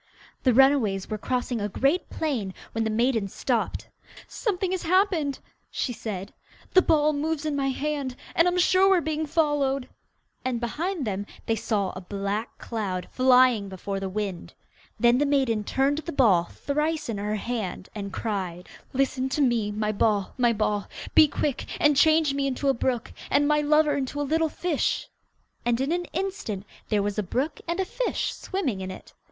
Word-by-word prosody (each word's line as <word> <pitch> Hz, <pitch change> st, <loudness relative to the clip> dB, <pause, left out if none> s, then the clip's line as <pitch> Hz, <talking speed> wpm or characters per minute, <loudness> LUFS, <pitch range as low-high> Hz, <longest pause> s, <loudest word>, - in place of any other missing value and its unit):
The 255 Hz, -, +4 dB
runaways 235 Hz, -7 st, +3 dB
were 215 Hz, -, -2 dB
crossing 245 Hz, -1 st, -1 dB
a 205 Hz, -, -1 dB
great 275 Hz, -, +1 dB
plain, 240 Hz, -12 st, -2 dB, 0.2 s
when 225 Hz, -, -1 dB
the 220 Hz, -, 0 dB
maiden 225 Hz, -1 st, +1 dB
stopped. -, -, -2 dB, 0.4 s
'Something 380 Hz, -4 st, -2 dB
has 375 Hz, -, -1 dB
happened!' 340 Hz, -5 st, +2 dB, 0.3 s
she 245 Hz, -, -2 dB
said. 200 Hz, -3 st, -6 dB, 0.4 s
'The 370 Hz, -, +8 dB
ball 305 Hz, -3 st, +3 dB
moves 310 Hz, +1 st, -2 dB
in 300 Hz, -2 st, 0 dB
my 275 Hz, -1 st, 0 dB
hand, 280 Hz, -1 st, -2 dB, 0.2 s
and 335 Hz, -, +4 dB
I'm 355 Hz, 0 st, +1 dB
sure 370 Hz, +2 st, +5 dB
we 385 Hz, -, +5 dB
are -, -, +1 dB
being 315 Hz, 0 st, -2 dB
followed!' 290 Hz, -4 st, +1 dB, 0.6 s
and 255 Hz, -2 st, -1 dB
behind 305 Hz, -, -2 dB
them 205 Hz, -1 st, -3 dB, 0.2 s
they 225 Hz, -, +1 dB
saw 200 Hz, -3 st, -1 dB
a 185 Hz, -, -8 dB
black 200 Hz, +4 st, -3 dB
cloud 195 Hz, -6 st, -4 dB
flying 255 Hz, -5 st, +4 dB
before 195 Hz, +1 st, -4 dB
the 195 Hz, 0 st, -3 dB
wind. 195 Hz, -3 st, -4 dB, 0.4 s
Then 240 Hz, +1 st, +5 dB
the 290 Hz, -, +3 dB
maiden 260 Hz, -7 st, +2 dB
turned 275 Hz, +6 st, +1 dB
the 335 Hz, +2 st, -5 dB
ball 205 Hz, -, +4 dB
thrice 300 Hz, -, -2 dB
in 220 Hz, -4 st, -3 dB
her 210 Hz, +1 st, -1 dB
hand, 210 Hz, -4 st, -4 dB
and 200 Hz, -2 st, -5 dB
cried, 185 Hz, -5 st, -4 dB, 0.2 s
'Listen 265 Hz, 0 st, 0 dB
to 295 Hz, -, 0 dB
me, 235 Hz, -5 st, +2 dB
my 210 Hz, 0 st, -1 dB
ball, 205 Hz, -2 st, +1 dB
my 240 Hz, -2 st, +3 dB
ball. 210 Hz, -2 st, 0 dB, 0.3 s
Be 310 Hz, -, +8 dB
quick 285 Hz, -1 st, -2 dB
and 295 Hz, -1 st, +4 dB
change 310 Hz, 0 st, +4 dB
me 275 Hz, 0 st, 0 dB
into 275 Hz, +1 st, 0 dB
a -, -, +4 dB
brook, 245 Hz, -1 st, -2 dB, 0.2 s
And 290 Hz, +1 st, +3 dB
my 300 Hz, 0 st, +3 dB
lover 300 Hz, 0 st, +3 dB
into 280 Hz, +1 st, -3 dB
a -, -, +1 dB
little 320 Hz, +3 st, +1 dB
fish.' 335 Hz, -2 st, -1 dB, 0.5 s
And 240 Hz, 0 st, +1 dB
in 270 Hz, +4 st, 0 dB
an 350 Hz, +1 st, 0 dB
instant 370 Hz, -, -4 dB, 0.2 s
there 210 Hz, -2 st, +2 dB
was 205 Hz, +1 st, -2 dB
a -, -, +3 dB
brook 265 Hz, -, -2 dB
with 345 Hz, +2 st, -1 dB
a 380 Hz, -, +1 dB
fish -, -, -2 dB
swimming 275 Hz, -, -3 dB
in 190 Hz, -, -4 dB
it. 185 Hz, -, -10 dB
260 Hz, 180 wpm, -26 LUFS, 210-300 Hz, 0.6 s, The